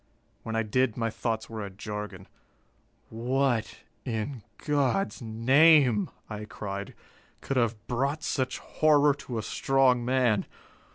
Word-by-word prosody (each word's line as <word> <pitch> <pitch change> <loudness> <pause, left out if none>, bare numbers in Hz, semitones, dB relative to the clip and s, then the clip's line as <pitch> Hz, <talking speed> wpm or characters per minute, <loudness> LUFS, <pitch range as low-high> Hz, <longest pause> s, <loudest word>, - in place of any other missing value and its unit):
When 115 - -5
I 115 - +1
did, 120 +2 +1
my 115 -1 -1
thoughts 110 -1 -3
were 110 -2 -6
a 100 - -5
jargon. 105 -1 -7 0.8
"What, 120 0 -1 0.2
in 120 +1 -3 0.2
God's 145 +5 0
name," 125 +1 +4 0.2
I 105 -1 -6
cried, 100 -2 -6 0.5
"could 135 - -2
have 115 -2 +2
brought 140 +7 -1
such 130 -3 -1
horror 150 -2 +3
to 130 -4 -7
a 110 - -2
strong 130 -1 +2
man? 125 -4 +2
120 Hz, 125 wpm, -28 LUFS, 110-135 Hz, 0.8 s, name